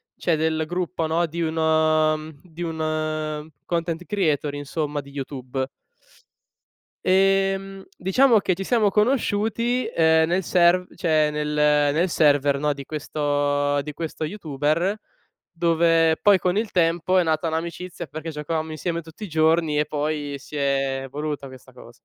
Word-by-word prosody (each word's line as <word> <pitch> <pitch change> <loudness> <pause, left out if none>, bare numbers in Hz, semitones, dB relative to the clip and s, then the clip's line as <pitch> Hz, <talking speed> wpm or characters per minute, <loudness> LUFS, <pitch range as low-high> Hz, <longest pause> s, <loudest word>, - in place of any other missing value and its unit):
cioè 170 - 0
del 160 0 0
gruppo, 175 -1 -2
no, 165 +2 +1
di 170 +1 -5
uno, 160 -1 +2
mhmm 155 -2 -11
di 175 -1 -8
un 155 -1 -3 0.2
content 170 0 -2
creator, 155 -8 0
insomma, 145 +1 -3
di 140 0 -15
YouTube. 135 -1 -4 1.4
Ehm, 195 0 +2
diciamo 225 +5 +4
che 185 -2 0
ci 195 - -5
siamo 215 -1 +2
conosciuti, 230 +2 +1
ehm, 160 -5 +3
nel 180 +2 0
serv 180 +1 +3
cioè 155 -3 +2
nel 150 0 -2 0.5
nel 175 +4 +1
server, 145 -3 +3
no, 150 0 +1
di 140 -1 -9
questo 145 -1 0
di 150 0 -7
questo 160 0 -5
YouTuber, 160 +2 -1 0.5
dove 165 -1 +3
poi 200 -2 +5
con 180 +3 0
il 220 -1 -1
tempo 175 +1 +2
è 180 - +4
nata 160 +1 0
un'amicizia 170 +1 -4
perché 155 +3 -6
giocavamo 155 +1 -3
insieme 170 +1 -3
tutti 160 +6 -12
i - - -4
giorni 160 -1 +2
e 150 - +2
poi 150 -1 -3
si 150 - -11
è 135 -1 0
evoluta 145 +1 -5
questa 130 -1 -14
cosa. - - -14
160 Hz, 145 wpm, -23 LUFS, 150-180 Hz, 1.4 s, poi